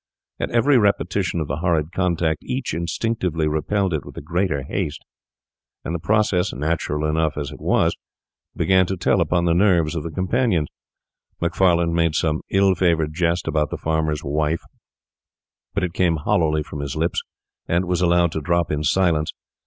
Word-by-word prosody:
At - - -2
every 125 +3 +4
repetition 95 -4 +1
of 75 - -3
the - - -3
horrid 80 -2 0
contact 85 -4 0
each 130 - -3
instinctively 85 -1 -1
repelled 90 +5 0
it 75 -3 -2
with - - -12
the - - -6
greater 85 -3 -1
haste; 75 +2 -4 0.8
and 85 - -3
the 85 - -2
process, 100 -1 +1
natural 75 +1 -1
although 80 0 0
it 70 -2 -6
was, - - +2 0.6
began 95 -1 +3
to 95 - -2
tell - - +2
upon 85 -1 +1
the 85 - +3
nerves 85 -4 +3
of 80 - -1
the 85 - -5
companions. 95 -2 0 0.7
Macfarlane 85 -1 +2
made 85 -2 +1
some 80 0 0
ill 95 0 +4
favoured 85 -4 +1
jest 85 +1 0
about 75 -2 +1
the - - -4
farmer's 80 -2 -1
wife, 75 +3 -1 1.1
but 100 - 0
it 90 -2 -2
came 90 -3 +2
hollowly 75 0 +1
from 75 -1 -8
his 70 -2 -4
lips, 80 +2 0 0.5
and 85 +2 +1
was 90 0 -1
allowed 85 -1 +3
to 80 - -3
drop 85 +2 0
in 75 0 -1
silence. 80 -2 +2
85 Hz, 170 wpm, -22 LUFS, 75-90 Hz, 1.1 s, every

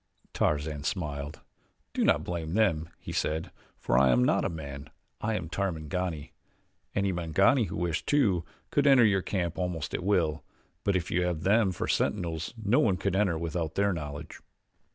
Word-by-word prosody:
Tarzan 75 0 0
smiled. 75 -4 -3 0.5
"Do - - +1
not - - +3
blame 85 -1 -3
them," 85 -8 +2
he - - -8
said, 80 +1 -1 0.3
"for - - +2
I 70 -1 +5
am 60 0 +4
not - - +3
a - - 0
man. 70 -4 -7 0.3
I 110 0 0
am 90 -5 -3
Tarmangani. 85 -3 -3 0.6
Any 100 -1 +1
Mangani 95 - +3
who - - -5
wished 85 -2 -2
to, 105 - +3 0.3
could 145 0 +3
enter 135 -4 +7
your 95 -3 +3
camp 90 -3 -2
almost 90 -5 -2
at - - -2
will; 80 -7 +1 0.4
but 100 - +1
if 90 -3 -1
you 90 - +2
have 85 -3 -2
them 100 0 +4
for 90 - -3
sentinels 85 -5 -1
no 110 +2 +2
one 95 -5 +3
could 95 +1 -1
enter 95 -5 +2
without 80 -1 -3
their 100 0 +2
knowledge." 75 -3 -6
85 Hz, 175 wpm, -29 LUFS, 80-100 Hz, 0.6 s, enter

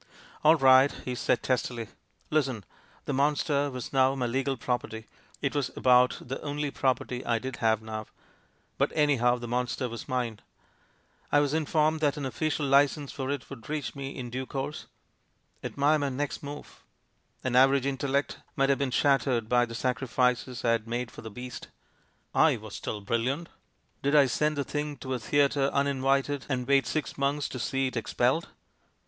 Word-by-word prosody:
"AU 155 +1 +7
right!" 135 -1 +6
he 125 - -2
said 120 -1 0
testily. 120 -3 -1 0.4
"Listen. 135 -8 0 0.4
The 145 - -2
monster 145 +1 +1
was 130 -1 -7
now 135 0 +4
my 130 -2 -1
legal 135 +2 -1
property 110 -3 -3 0.2
— - - -28
it 140 - 0
was 145 -3 0
about 125 0 +4
the 130 +2 -6
only 145 0 -3
property 130 -2 -1
I 120 -1 +1
did 130 +2 -5
have 110 -1 +1
now, 110 -1 -5 0.7
but - - +2
any 150 -2 +3
how, 120 +1 +3
the 120 0 -7
monster 125 +1 -1
was 115 -1 -7
mine. 120 -4 -2 0.9
I 145 - +5
was 145 0 +1
informed 155 0 +2
that 150 -2 +1
an 145 - -3
official 150 +2 -1
licence 140 +1 +3
for 135 -1 -4
it 140 -3 -3
would 130 -2 -10
reach 150 -3 -3
me 140 -1 -5
in 125 -2 -6
due 130 +1 -4
course. 140 +3 -4 0.8
Admire 145 +2 +2
my 145 -1 0
next 140 +2 -3
move 145 +1 -9 0.6
I - - +2
An 125 - -2
average 135 +1 +5
in 140 -1 -1
tellect 140 +1 0 0.2
might 135 0 +2
have 140 - +2
been 140 -2 0
shattered 125 -4 +2
by 120 +1 +3
the 115 - -7
sacri 125 +2 -1
fices 125 0 0
I 115 - +4
had 115 -1 0
made 120 +1 -3
for - - -10
the 110 - -7
beast; 125 +3 -8 0.7
I - - +4
was - - -10
still 105 - -5
bril 115 +3 +1
liant. 145 +6 -2 0.5
Did 140 +2 +1
I 145 -2 +7
send 150 +4 0
the 140 - +1
thing 150 0 -3
to 130 -1 -5
a 125 - -2
theatre 140 +2 +2
unin 140 -1 0
vited 135 +1 +1
and 125 -3 -1
wait 140 -1 +3
six 155 -2 -3
months 140 +1 0
to 130 - -6
see 135 +2 0
it 130 - -3
expelled? - - +1
135 Hz, 190 wpm, -28 LUFS, 125-145 Hz, 0.9 s, AU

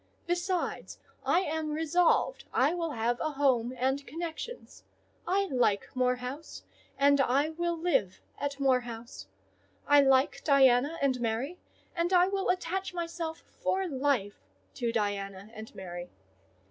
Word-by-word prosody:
Besides, 350 +1 -2 0.3
I 360 - +3
am 315 -3 -2
resolved 330 +9 +2
I 280 +5 +3
will 340 -2 -2
have 235 +1 0
a 310 -1 -2
home 260 -4 +2
and 265 +3 0
connections. 340 - -7 0.4
I 390 +3 +2
like 245 - +1
Moor 250 0 +2
House, 255 +5 -7 0.3
and 280 0 +5
I 275 +4 +2
will 340 +1 -2
live 320 - 0 0.2
at 285 0 -3
Moor 265 -2 +4
House; 230 - -9 0.6
I 290 0 +6
like 270 0 +3
Diana 275 +1 +4
and 260 -3 +1
Mary, 240 +9 -2 0.4
and 340 +1 0
I 360 0 +6
will 390 -1 -1
attach 365 +1 -1
myself 335 -1 -4 0.2
for 380 0 0
life 265 - 0 0.3
to 240 -3 -1
Diana 200 -2 -3
and 220 0 -10
Mary. 175 -2 -7
280 Hz, 135 wpm, -30 LUFS, 245-335 Hz, 0.6 s, I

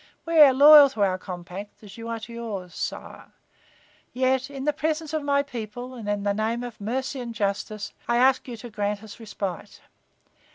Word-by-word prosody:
We 330 -1 +2
are 290 -3 +10
loyal 290 +2 +9
to 220 -6 -1
our 185 -1 +1
compact, 185 +3 -9
as 205 - -12
you 230 0 -8
are 230 -1 -3
to 235 +2 -9
yours, 205 -6 -6
sire. - - -6 0.8
Yet, 260 +1 +1
in 275 -1 -7
the 300 +1 +1
presence 310 +1 -2
of 310 - 0
my 280 0 +1
people 245 -1 -7
and 225 -5 -7
in 205 -1 -1
the 200 0 +1
name 225 +3 -1
of 240 -4 -8
mercy 260 +5 -3
and 235 -2 -6
justice, 205 0 -3
I 235 0 +2
ask 260 +2 +3
you 240 -2 -6
to 235 +1 -10
grant 210 0 -2
us 215 0 -11
respite. 205 -3 -6
235 Hz, 195 wpm, -25 LUFS, 205-265 Hz, 0.8 s, are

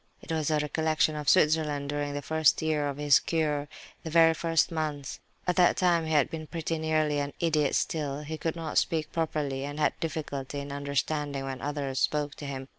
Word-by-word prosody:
It - - -9
was 160 -2 0
a 155 - +2
recollection 155 +1 +1
of 150 -1 -1
Switzerland, 150 -4 +3
during 145 0 -2
the 145 - -4
first 160 -1 +2
year 150 -2 +1
of 140 - -5
his 145 -1 +5
cure, 150 -3 -1 0.4
the 160 - -5
very 165 0 +6
first 165 0 +1
months. 150 -4 -3 0.3
At 180 0 0
that 180 -1 +5
time 170 -3 +2
he - - -3
had 150 -1 +3
been 160 -2 -6
pretty 165 0 -3
nearly 155 -2 +1
an 140 0 -3
idiot 155 -4 +1
still; 145 -3 -1
he 155 +1 -6
could 165 0 -2
not 165 -2 0
speak 160 -2 -1
properly, 150 -4 -2
and 145 +2 -5
had 150 - +2
difficulty 145 -3 -4
in 140 0 -6
understanding 140 0 -2
when 135 -1 -5
others 140 -2 -2
spoke 150 -1 0
to 145 - -7
him. 135 -1 -5
150 Hz, 200 wpm, -28 LUFS, 145-160 Hz, 0.4 s, very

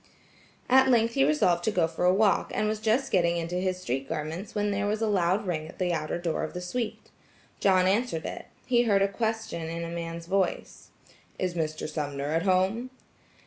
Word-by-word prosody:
At 265 +1 +6
length 230 -2 +3
he 135 - +3
resolved 170 +4 +2
to - - +3
go 180 -6 +2
for 165 +2 -2
a 180 - +6
walk, 200 +2 +2
and 215 - +1
was 215 0 -1
just 230 +5 +1
getting 170 -2 +2
into 170 +1 -3
his 185 0 -1
street 135 -5 -3
garments 165 +6 -4
when 205 0 0
there 205 +1 -1
was 210 +1 0
a 225 - +1
loud 195 0 +1
ring 155 -4 -2
at - - -12
the 180 -1 0
outer 155 -1 -2
door 170 -2 -2
of - - -5
the - - -2
suite. 215 +5 -4 0.5
John 185 -2 +4
answered 195 -4 0
it. - - -6 0.2
He 240 -1 +3
herd 200 -3 +3
a - - +3
question 220 -5 -3
in 170 +1 -4
a 170 0 -5
man's 170 0 -5
voice: 190 0 -2 0.5
"Is 185 -1 -1
Mr. 155 -2 -3
Sumner 145 -2 -3
at 165 +1 +1
home?" 190 +6 +1
185 Hz, 205 wpm, -27 LUFS, 165-210 Hz, 0.5 s, At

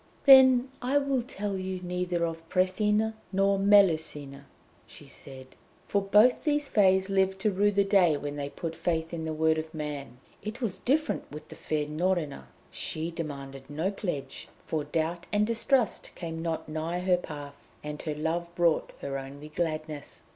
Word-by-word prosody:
"Then 260 -2 +8
I 260 +3 +2
will 275 -2 +1
tell 205 -5 -4
you 185 0 -4
neither 180 -1 -1
of 165 0 -6
Pressina 210 +4 +2 0.2
nor 195 0 +2
Melusina," 160 -8 +2 0.4
she - - -12
said, 130 -1 -11 0.4
"for 200 - +1
both 210 +5 +4
these 295 -2 +1
Fées 190 -4 +4
lived 190 -1 +1
to 215 0 +2
rue 200 +2 +3
the 200 -1 +3
day 185 -6 +4
when 145 0 -5
they 145 -1 -4
put 165 +2 -5
faith 165 0 -2
in 160 -1 -3
the 160 - -2
word 160 0 +2
of 160 0 -7
man. 145 -5 -5 0.2
It 215 +3 -6
was 200 -7 -2
different 305 +5 0
with 150 +1 -9
the - - -10
fair 150 -1 -2
Norina. 155 - -1 0.3
She 160 +2 -4
demanded 140 -5 -7
no 160 +7 -1
pledge, 160 -10 -5 0.2
for 155 -2 -2
doubt 165 +3 -2
and 210 0 +3
distrust 230 0 +1
came 165 -2 -5
not 165 -1 -3
nigh 160 +3 -3
her 180 0 +3
path, 145 -4 -9 0.2
and 150 0 -5
her 155 -2 -3
love 165 +3 -1
brought 170 -2 +2
her 135 -1 -3
only 140 +3 -9
gladness." 155 -2 -4
170 Hz, 170 wpm, -28 LUFS, 155-200 Hz, 0.4 s, Then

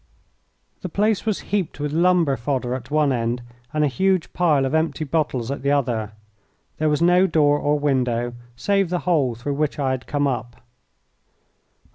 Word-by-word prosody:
The 185 - -5
place 210 +4 0
was 215 - 0
heaped 185 -7 -1
with 145 0 -2
lumber 170 -4 +3
fodder 125 0 -2
at 130 0 -6
one 150 -2 +2
end 120 0 -2 0.3
and 150 0 +1
a - - +4
huge 190 +5 0
pile 155 -6 +2
of 135 - -2
empty 160 -1 0
bottles 140 -5 -1
at 140 - -4
the 140 - 0
other. 120 -7 0 0.7
There 155 0 +2
was 150 +2 +1
no 180 +2 +5
door 145 -3 +3
or 145 +1 +1
window 125 -4 0 0.2
save 195 +6 +1
the 180 0 -1
hole 145 -9 +2
through 130 +5 -4
which 150 +1 -1
I 135 -3 0
had 130 -1 -4
come 145 -1 0
up. 125 -3 -3
145 Hz, 175 wpm, -22 LUFS, 130-165 Hz, 0.7 s, no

